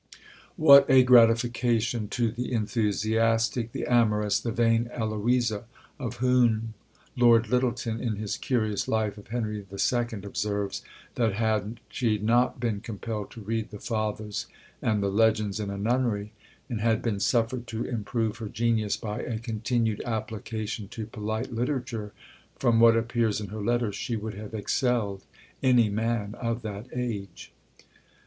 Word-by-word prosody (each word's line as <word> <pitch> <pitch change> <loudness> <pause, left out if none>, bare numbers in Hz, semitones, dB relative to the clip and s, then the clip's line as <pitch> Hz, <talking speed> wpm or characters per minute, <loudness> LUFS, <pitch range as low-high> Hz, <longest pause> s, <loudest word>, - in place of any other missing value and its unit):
What 140 -5 +8
a 130 -1 +7
gratification 120 -1 +3
to 115 +2 0
the 120 +3 -4
enthusiastic, 115 +1 +1
the - - -4
amorous, 105 -4 +2
the 115 - -3
vain 115 +1 +2
Eloisa! 115 0 0 0.3
of 120 -3 -4
whom 120 -3 +2 0.4
Lord 120 -3 +5
Lyttleton, 120 -2 0
in 115 -4 -1
his 105 0 -3
curious 110 -5 -1
Life 110 -2 -1
of 100 - -15
Henry 110 -1 -2
II., 115 +4 -1
observes, 100 0 -2 0.3
that 115 -4 +1
had 110 +1 -1
she 115 -4 0
not 120 +5 +2
been 115 -4 -1
compelled 110 -1 -5
to 115 - -11
read 110 +1 -2
the 105 - -8
fathers 110 -1 -3 0.3
and 105 -2 +1
the 100 - 0
legends 110 -1 +2
in 105 -2 -3
a 100 - -4
nunnery, 110 -1 0 0.3
and 115 -5 -3
had 115 0 +1
been 110 -4 -1
suffered 120 +3 0
to 115 0 -3
improve 115 -1 -2
her 110 -2 -6
genius 110 -2 0
by 105 -2 -4
a 115 -3 -3
continued 115 0 -1
application 110 -1 -4
to 110 +2 -6
polite 110 +3 -4
literature, 120 -3 -2 0.5
from 120 -3 +3
what 115 0 +7
appears 115 -2 0
in 105 -3 -6
her 110 +1 -6
letters, 120 -1 0
she 120 -4 -2
would 110 0 -4
have 105 +2 -8
excelled 110 -2 -1 0.4
any 125 -4 +4
man 110 -1 -1
of 115 0 -2
that 105 +2 -6
age. 110 -7 -5
115 Hz, 145 wpm, -27 LUFS, 105-120 Hz, 0.5 s, What